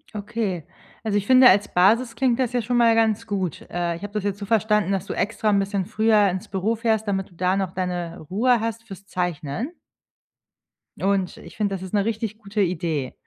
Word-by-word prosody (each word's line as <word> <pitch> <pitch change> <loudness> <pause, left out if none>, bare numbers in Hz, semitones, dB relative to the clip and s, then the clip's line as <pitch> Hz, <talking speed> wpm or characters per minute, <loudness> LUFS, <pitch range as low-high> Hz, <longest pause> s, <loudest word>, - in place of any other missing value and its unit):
Okay. 205 -5 -3 0.4
Also, 210 -2 0
ich 200 - -2
finde, 255 0 +8
als 200 +2 +4
Basis 225 +6 +3
klingt 250 0 +1
das 250 -2 +1
ja 245 - +1
schon 240 +2 -1
mal 230 -1 +5
ganz 225 0 +1
gut. 190 -6 -2
Äh, 175 -1 -1
ich 170 - -10
habe 205 - -6
das 210 -2 -2
jetzt 200 0 -2
so 200 - -5
verstanden, 210 -2 +2
dass 195 -1 -1
du - - -4
extra 215 +1 -1
‘n 200 -1 +3
bisschen 195 -1 -1
früher 215 -1 +3
ins 185 +1 -4
Büro 200 +4 -1
fährst, 220 -1 0
damit 195 -1 -1
du 175 - -21
da 180 +2 +1
noch 190 -2 -1
deine 175 -2 -3
Ruhe 240 +5 +3
hast 225 0 -3
für‘s 195 -2 -11
Zeichnen? 180 - -3 1.3
Und, 195 -1 0
ich - - -13
finde, 205 -2 0
das 185 - -7
ist 190 +2 -8
‘ne 200 0 +2
richtig 220 -1 -3
gute 210 -1 -3
Idee. 160 -7 -1
200 Hz, 215 wpm, -23 LUFS, 185-225 Hz, 1.3 s, finde